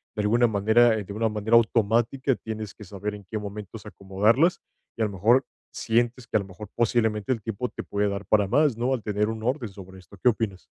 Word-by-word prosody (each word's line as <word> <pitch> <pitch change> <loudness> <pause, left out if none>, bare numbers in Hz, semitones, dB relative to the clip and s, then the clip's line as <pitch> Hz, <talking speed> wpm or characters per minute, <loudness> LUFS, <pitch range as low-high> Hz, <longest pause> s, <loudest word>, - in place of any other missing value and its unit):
de 105 - -1
alguna 120 +4 +3
manera, 110 +3 +4
de 100 -2 -5
una 110 +2 0
manera 105 +2 +1
automática, 115 +4 +2
tienes 110 -3 -6
que - - -13
saber 100 +2 -5
en 100 -1 -12
qué 110 - -3
momentos 105 +1 -8
acomodarlas, 105 - +1 0.3
y - - -5
a - - +3
lo 105 - -3
mejor 115 +8 +3 0.3
sientes 120 +2 0
que - - +1
a - - +1
lo 100 - -5
mejor 100 +2 -10
posiblemente 110 -2 +1
el 115 - -6
tiempo 115 +3 -3
te - - -7
puede 100 0 -1
dar 100 0 -4
para 105 +1 +3
más, 145 +2 +2
¿no? 125 +3 0
Al 120 - -3
tener 105 0 0
un 110 0 -5
orden 125 0 -1
sobre 95 -1 -12
esto. 90 -3 -16
¿Qué 125 - +6
opinas? 105 -5 -2
110 Hz, 225 wpm, -25 LUFS, 100-120 Hz, 0.3 s, Qué